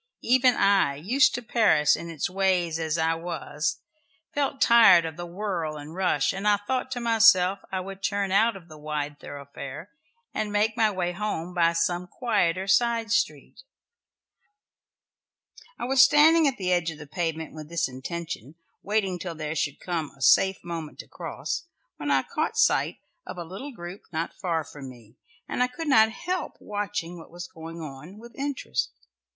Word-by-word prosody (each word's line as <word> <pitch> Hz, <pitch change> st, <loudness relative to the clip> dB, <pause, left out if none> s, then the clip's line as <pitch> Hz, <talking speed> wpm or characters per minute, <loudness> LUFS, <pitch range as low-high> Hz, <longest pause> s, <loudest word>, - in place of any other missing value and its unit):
Even 255 Hz, +1 st, +4 dB
I, 195 Hz, -8 st, +3 dB
used 220 Hz, -, +3 dB
to 245 Hz, -, -5 dB
Paris 215 Hz, -11 st, +4 dB
and 170 Hz, -, -7 dB
its 160 Hz, -3 st, -2 dB
ways 180 Hz, -3 st, +1 dB
as 160 Hz, 0 st, -1 dB
I 160 Hz, 0 st, +2 dB
was, 170 Hz, +2 st, -3 dB, 0.5 s
felt 280 Hz, -1 st, -1 dB
tired 225 Hz, -9 st, +7 dB
of 160 Hz, -2 st, -5 dB
the 175 Hz, +1 st, -6 dB
whirl 170 Hz, -4 st, -3 dB
and 150 Hz, +2 st, -9 dB
rush, 185 Hz, +1 st, +1 dB
and 195 Hz, +2 st, -3 dB
I 205 Hz, -1 st, +5 dB
thought 255 Hz, +6 st, -2 dB
to 245 Hz, -, -4 dB
myself 220 Hz, -5 st, +5 dB
I 190 Hz, -1 st, -1 dB
would 195 Hz, +1 st, -8 dB
turn 200 Hz, -1 st, -1 dB
out 220 Hz, +3 st, +3 dB
of 180 Hz, -3 st, -12 dB
the 155 Hz, -2 st, -13 dB
wide 150 Hz, -1 st, -4 dB
thoroughfare 140 Hz, 0 st, -9 dB, 0.4 s
and 210 Hz, -1 st, -2 dB
make 210 Hz, +1 st, +1 dB
my 220 Hz, -1 st, +3 dB
way 180 Hz, -3 st, -2 dB
home 180 Hz, -2 st, -4 dB
by 170 Hz, -1 st, +3 dB
some 175 Hz, +2 st, 0 dB
quieter 190 Hz, -5 st, 0 dB
side 230 Hz, +2 st, +2 dB
street. 235 Hz, 0 st, -1 dB, 2.2 s
I -, -, -4 dB
was 265 Hz, +1 st, +5 dB
standing 305 Hz, +3 st, +6 dB
at 270 Hz, -, -1 dB
the 185 Hz, -2 st, -1 dB
edge 175 Hz, -2 st, +1 dB
of 160 Hz, -, -7 dB
the 150 Hz, -, -10 dB
pavement 160 Hz, 0 st, -3 dB
with 155 Hz, -1 st, -9 dB
this 170 Hz, -1 st, 0 dB
intention, 140 Hz, +1 st, -6 dB, 0.3 s
waiting 195 Hz, -3 st, -1 dB
till 170 Hz, -1 st, -5 dB
there 155 Hz, -1 st, -4 dB
should 145 Hz, -2 st, -2 dB
come 165 Hz, -5 st, -3 dB
a -, -, -18 dB
safe 190 Hz, +8 st, +4 dB
moment 165 Hz, -3 st, -6 dB
to -, -, -19 dB
cross, -, -, -5 dB, 0.3 s
when -, -, -4 dB
I -, -, +3 dB
caught -, -, -3 dB
sight -, -, +3 dB, 0.3 s
of -, -, -7 dB
a 175 Hz, -, -4 dB
little 195 Hz, -, -8 dB
group 180 Hz, -4 st, -9 dB
not 165 Hz, 0 st, -3 dB
far 170 Hz, -5 st, 0 dB
from 140 Hz, -2 st, -10 dB
me, 120 Hz, -1 st, -16 dB, 0.3 s
and -, -, -2 dB
I 250 Hz, -, +4 dB
could 280 Hz, +6 st, -7 dB
not 220 Hz, -6 st, +6 dB
help 360 Hz, +8 st, -4 dB
watching 205 Hz, -4 st, -4 dB
what 165 Hz, -, -13 dB
was 175 Hz, +1 st, -8 dB
going 165 Hz, +1 st, -9 dB
on, 155 Hz, +6 st, -9 dB
with 235 Hz, +2 st, -13 dB
interest. 280 Hz, -1 st, -2 dB
180 Hz, 180 wpm, -26 LUFS, 160-215 Hz, 2.2 s, tired